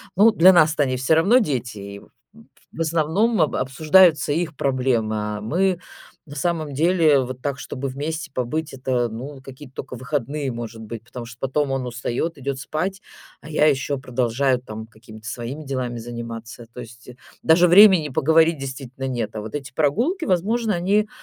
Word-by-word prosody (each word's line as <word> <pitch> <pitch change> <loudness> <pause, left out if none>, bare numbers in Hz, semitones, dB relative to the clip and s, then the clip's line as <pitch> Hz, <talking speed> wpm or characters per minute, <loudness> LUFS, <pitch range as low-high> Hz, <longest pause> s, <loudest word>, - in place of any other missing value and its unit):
Ну, 215 +4 +6
для 185 0 +6
нас-то 155 -3 +4
они 130 -1 -1
всё 130 +5 +2
равно 200 +11 +5
дети, 125 - -2
и 100 0 -8
в - - -19 0.6
в 165 - -6
основном 165 +7 +1
об 155 - +1
обсуждаются 155 +3 +4
их 165 -2 -2
проблемы. 125 -5 0
А 105 0 -3
мы, 180 - 0 0.5
на 145 - -10
самом 155 -1 -2
деле, 160 -2 +3
вот 130 0 -6
так, 140 0 -3
чтобы 135 0 -5
вместе 150 +4 -4
побыть, 150 +5 -3
это, 130 -2 -1
ну, 130 +5 -8
какие-то 135 0 -12
тока 130 -1 -7
выходные, 140 +2 -3
может 115 -1 -7
быть, 110 0 -7
потому 120 0 -9
что 115 0 -12
потом 135 +1 -1
он 130 -2 -2
устаёт, 125 +6 -3
идёт 135 0 -4
спать, 185 +8 -3 0.4
а 150 - -11
я 150 0 +2
ещё 140 0 0
продолжаю 130 0 0
там 110 -2 -8
какими-то 110 -1 -15
своими 125 +7 -5
делами 130 -3 -3
заниматься. 115 0 -8
То 125 - -7
есть, 120 +1 -13
э, 125 - -11 0.3
даже 175 +2 +5
времени 185 -4 +7
поговорить 160 +3 +3
действительно 135 -1 -6
нет, 120 -4 -3
а 105 - -3
вот 110 +6 -7
эти 140 -1 -6
прогулки, 240 - 0
возможно, 210 +4 +1
они 200 +5 +1
140 Hz, 175 wpm, -22 LUFS, 125-160 Hz, 0.6 s, времени